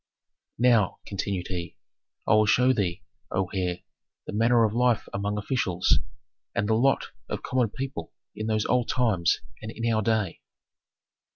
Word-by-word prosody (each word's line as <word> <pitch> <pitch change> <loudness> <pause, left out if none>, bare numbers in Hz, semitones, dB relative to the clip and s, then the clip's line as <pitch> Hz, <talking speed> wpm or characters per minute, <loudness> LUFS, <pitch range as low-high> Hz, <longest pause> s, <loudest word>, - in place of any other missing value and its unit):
"Now," 115 -5 +3
continued 100 -2 -3
he, 85 -3 -5 0.5
"I - - +3
will 110 0 +5
show 125 +4 +4
thee, 95 -7 -1 0.3
O 95 -1 -1
heir, 90 -2 -1 0.4
the - - -6
manner 115 +2 +4
of 105 - -1
life 120 -2 +2
among 100 +1 -2
officials, 100 -5 +1 0.6
and 105 - 0
the 110 - +2
lot 130 +5 +2 0.2
of - - -4
common 125 -3 +1
people 135 +5 -5 0.2
in 110 +1 -4
those 110 -1 +1
old 125 -1 +1
times 105 -9 +2 0.2
and 110 - -6
in 115 0 -1
our 110 - +2
day." 110 -4 0
110 Hz, 155 wpm, -26 LUFS, 100-120 Hz, 0.6 s, will